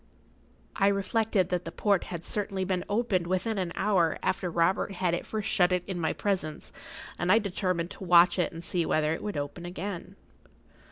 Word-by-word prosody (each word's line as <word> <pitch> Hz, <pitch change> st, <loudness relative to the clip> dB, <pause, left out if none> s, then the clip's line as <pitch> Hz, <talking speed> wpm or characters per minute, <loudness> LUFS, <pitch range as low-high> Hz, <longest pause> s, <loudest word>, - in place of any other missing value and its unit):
I 195 Hz, -, +3 dB
reflected 200 Hz, -1 st, +1 dB
that 180 Hz, -1 st, -1 dB
the 165 Hz, -, -6 dB
port 200 Hz, +1 st, +1 dB
had 170 Hz, -1 st, -6 dB
certainly 195 Hz, -2 st, -2 dB
been 185 Hz, -1 st, -1 dB
opened 205 Hz, -5 st, +1 dB
within 190 Hz, +4 st, 0 dB
an 180 Hz, -2 st, -2 dB
hour 180 Hz, -6 st, +2 dB
after 185 Hz, -1 st, 0 dB
Robert 175 Hz, +4 st, +1 dB
had 180 Hz, -2 st, 0 dB
at 175 Hz, -, -3 dB
first 215 Hz, -2 st, -3 dB
shut 180 Hz, 0 st, +3 dB
it 180 Hz, -1 st, +1 dB
in 185 Hz, -3 st, -4 dB
my 160 Hz, -, +1 dB
presence, 180 Hz, -7 st, -3 dB, 0.5 s
and 175 Hz, +2 st, +2 dB
I 220 Hz, -, +7 dB
determined 185 Hz, -4 st, -1 dB
to -, -, -9 dB
watch 175 Hz, 0 st, +6 dB
it 175 Hz, -, +1 dB
and 165 Hz, 0 st, -8 dB
see 175 Hz, -1 st, 0 dB
whether 155 Hz, -1 st, +1 dB
it -, -, -5 dB
would 205 Hz, -6 st, -4 dB
open 145 Hz, +4 st, -4 dB
again. 185 Hz, +1 st, -6 dB
180 Hz, 190 wpm, -28 LUFS, 170-195 Hz, 0.5 s, I